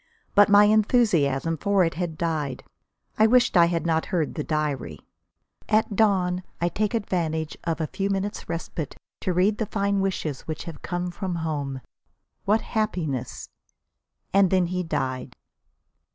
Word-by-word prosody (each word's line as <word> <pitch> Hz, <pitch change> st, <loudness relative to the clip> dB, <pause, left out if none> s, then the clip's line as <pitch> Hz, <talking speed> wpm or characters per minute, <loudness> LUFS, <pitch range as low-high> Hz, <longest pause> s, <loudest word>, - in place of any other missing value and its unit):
But 205 Hz, +1 st, +6 dB
my 205 Hz, 0 st, +8 dB
enthusiasm 200 Hz, -, +3 dB
for 200 Hz, +3 st, +2 dB
it 165 Hz, -, 0 dB
had 170 Hz, -2 st, -4 dB
died. 155 Hz, -6 st, -2 dB, 0.6 s
I 220 Hz, -, +7 dB
wished 250 Hz, 0 st, +4 dB
I 170 Hz, -1 st, +7 dB
had 170 Hz, -1 st, -1 dB
not 160 Hz, -1 st, +1 dB
heard 165 Hz, -5 st, -1 dB
the 150 Hz, -, -3 dB
diary. 145 Hz, -, -2 dB, 0.7 s
"At 215 Hz, -1 st, +2 dB
dawn 185 Hz, -4 st, +2 dB, 0.2 s
I 175 Hz, -, +1 dB
take 210 Hz, +4 st, -1 dB
advantage 160 Hz, -7 st, -1 dB
of 165 Hz, -1 st, -1 dB
a 160 Hz, -, 0 dB
few 195 Hz, +5 st, -3 dB
moments' 200 Hz, 0 st, -3 dB
respite 165 Hz, -3 st, -4 dB, 0.2 s
to 185 Hz, -, -1 dB
read 195 Hz, +5 st, +2 dB
over -, -, +2 dB
the -, -, -18 dB
kind 200 Hz, -1 st, +1 dB
wishes 170 Hz, -7 st, -2 dB
which 155 Hz, -1 st, -4 dB
have 160 Hz, -4 st, -9 dB
come 175 Hz, 0 st, -3 dB
from 180 Hz, 0 st, -4 dB
home. 140 Hz, -4 st, -3 dB, 0.6 s
What 215 Hz, +3 st, +3 dB
happiness!" 175 Hz, -, -3 dB, 0.9 s
And 195 Hz, -1 st, +5 dB
then 185 Hz, -1 st, +3 dB
he 180 Hz, -, 0 dB
died. 130 Hz, -6 st, -3 dB
175 Hz, 155 wpm, -25 LUFS, 155-200 Hz, 0.9 s, my